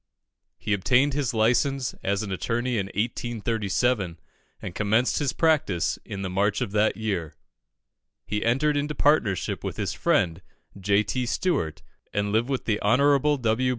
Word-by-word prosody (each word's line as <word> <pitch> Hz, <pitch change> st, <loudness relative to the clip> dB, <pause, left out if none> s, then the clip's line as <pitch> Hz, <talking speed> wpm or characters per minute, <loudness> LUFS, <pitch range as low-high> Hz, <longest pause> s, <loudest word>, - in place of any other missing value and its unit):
He 105 Hz, -, -2 dB
obtained 125 Hz, +8 st, +3 dB
his 140 Hz, -3 st, 0 dB
license 125 Hz, +4 st, +1 dB
as 100 Hz, +1 st, -1 dB
an 100 Hz, -, -5 dB
attorney 120 Hz, +4 st, -1 dB
in 95 Hz, -, -2 dB
1837, 110 Hz, -2 st, -1 dB, 0.4 s
and 90 Hz, -, -7 dB
commenced 110 Hz, +6 st, +1 dB
his 145 Hz, -4 st, 0 dB
practice 145 Hz, -, +1 dB
in 100 Hz, 0 st, -6 dB
the 95 Hz, -, -3 dB
March 100 Hz, +2 st, +1 dB
of 120 Hz, -6 st, -2 dB
that 105 Hz, +1 st, +2 dB
year. 100 Hz, -8 st, -3 dB, 0.9 s
He 105 Hz, 0 st, -2 dB
entered 135 Hz, +6 st, +2 dB
into 145 Hz, +1 st, -1 dB
partnership 130 Hz, -, +1 dB
with -, -, -4 dB
his -, -, -2 dB
friend, 85 Hz, +1 st, +1 dB, 0.3 s
J. 100 Hz, +2 st, +2 dB
T. 125 Hz, +5 st, -2 dB
Stewart, 130 Hz, -, -1 dB, 0.3 s
and 105 Hz, 0 st, -1 dB
lived 115 Hz, +4 st, +1 dB
with 135 Hz, -2 st, -2 dB
the 105 Hz, -2 st, 0 dB
Hon. 140 Hz, +6 st, +3 dB
W. 120 Hz, +3 st, +1 dB
110 Hz, 150 wpm, -25 LUFS, 100-130 Hz, 0.9 s, obtained